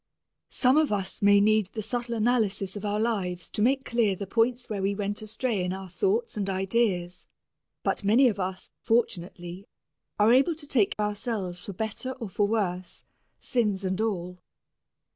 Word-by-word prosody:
Some 260 +2 +3
of 310 -5 +3
us 195 -2 -2
may 200 0 +6
need 215 -1 +3
the 215 +2 -6
subtle 235 +2 -2
analysis 215 -4 +1
of 205 - -6
our 205 0 -1
lives 190 -6 -2
to - - -2
make 265 +4 +2
clear 230 -5 +1
the 200 - -5
points 240 +4 +1
where 205 -3 -3
we 200 +1 0
went 205 0 -2
astray 215 -1 -1
in 180 0 -1
our 190 0 -7
thoughts 415 - 0
and 200 -2 -2
ideas, 190 -2 0 0.6
but - - -1
many 230 +7 +5
of 205 -4 -1
us, 185 0 -4
fortunately, 180 -4 -1 0.5
are 210 +3 +5
able 275 +6 +4
to 300 -1 -9
take 235 -8 +2
ourselves 205 -4 -2
for 200 - -6
better 220 +6 -3
or 235 -5 -7
for 205 +2 +1
worse, 185 -4 -2 0.4
sins 210 -6 0
and 190 +2 -1
all. 180 -5 -2
210 Hz, 170 wpm, -27 LUFS, 190-235 Hz, 0.6 s, may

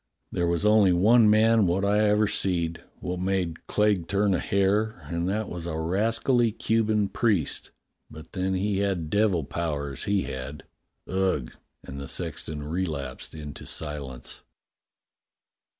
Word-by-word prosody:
There 85 - 0
was 85 +3 0
only 105 -3 +5
one 110 +5 +5
man 110 -1 +4
wot 95 +3 +1
I 105 +1 +3
ever 105 +1 +3
seed 85 -5 -1 0.2
wot 90 0 -3
made 90 -3 -2
Clegg 105 -5 +1
turn 100 0 +2
a 90 - +1
hair, 100 +3 +1
and 85 +1 -2
that 105 +2 -1
was 85 -1 -6
a 80 -2 -3
rascally 115 +8 +1
Cuban 110 -1 +1
priest, 100 - 0 0.4
but 80 0 -12
then 95 0 -1
he 100 +1 0
had 95 -6 -1
devil 100 -6 +2
powers, 70 -3 -4
he 100 -1 +1
had. 65 +2 -6 0.4
Ugh!" 95 -9 0 0.3
And 70 +1 -8
the 70 - -6
sexton 75 -1 -3
relapsed 75 -5 -4
into 75 -2 -8
silence. 70 -5 -3
95 Hz, 140 wpm, -26 LUFS, 80-105 Hz, 0.4 s, only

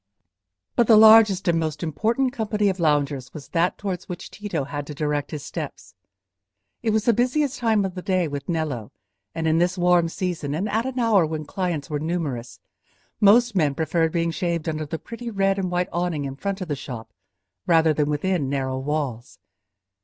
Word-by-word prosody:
But 235 - +3
the 220 - +7
largest 215 -3 +7
and 165 -1 +3
most 155 -1 -3
important 230 - 0
company 210 -4 0
of 190 -1 -3
loungers 145 -5 0
was 150 - -9
that 170 +1 +1
towards 190 -3 -5
which 180 - -7
Tito 200 -8 -3
had 145 +1 -5
to 150 - -7
direct 150 -1 -1
his 150 -3 -6
steps. - - -7 0.9
It 230 - 0
was 220 0 +1
the 235 - +5
busiest 255 +4 0
time 220 -4 +2
of 190 - -4
the 180 - -6
day 185 -3 +1
with 145 +1 -6
Nello, 150 -10 -2 0.4
and 165 -1 -1
in 160 +1 +3
this 180 +2 +1
warm 175 -1 +3
season 165 -6 -3
and 190 +7 -1
at 225 +4 0
an 260 -1 -5
hour 225 -6 +4
when 155 -1 -3
clients 175 -4 -3
were 150 -3 -2
numerous, 145 -7 -3 0.6
most 235 +4 +5
men 150 -7 +1
preferred 160 +1 +1
being 170 0 0
shaved 170 -1 -2
under 155 -1 -2
the 160 - -3
pretty 235 +6 -7
red 195 -2 +1
and 185 -2 -1
white 180 +1 -1
awning 175 -4 -1
in 135 -1 -5
front 195 +6 -4
of 185 - -4
the 145 - -1
shop 115 -5 -8 0.5
rather 160 -2 +4
than 150 0 0
within 150 -1 0
narrow 130 -1 -2
walls. 135 -4 -3
170 Hz, 190 wpm, -23 LUFS, 150-200 Hz, 0.9 s, the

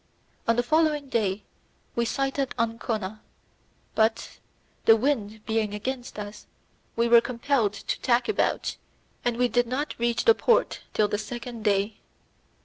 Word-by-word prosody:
On 230 - +4
the 245 - +2
following 300 0 +2
day 205 -4 0 0.5
we 235 - +1
sighted 270 +2 -1
Ancona, 220 -3 -2 0.7
but 220 0 0 0.5
the 225 - +8
wind 220 -4 -1
being 220 -2 0
against 245 +3 -5
us 210 0 -7 0.5
we 235 0 +2
were 235 0 +7
compelled 240 -3 0
to 200 - -4
tack 245 -1 +2
about, 430 - 0 0.5
and 240 -1 0
we 250 0 +3
did 245 0 +1
not 270 +5 -2
reach 235 0 0
the 455 - +8
port 470 +1 +2 0.2
till 210 - +3
the 205 0 -2
second 235 +1 -6
day. 205 0 +1
230 Hz, 140 wpm, -26 LUFS, 215-255 Hz, 0.7 s, the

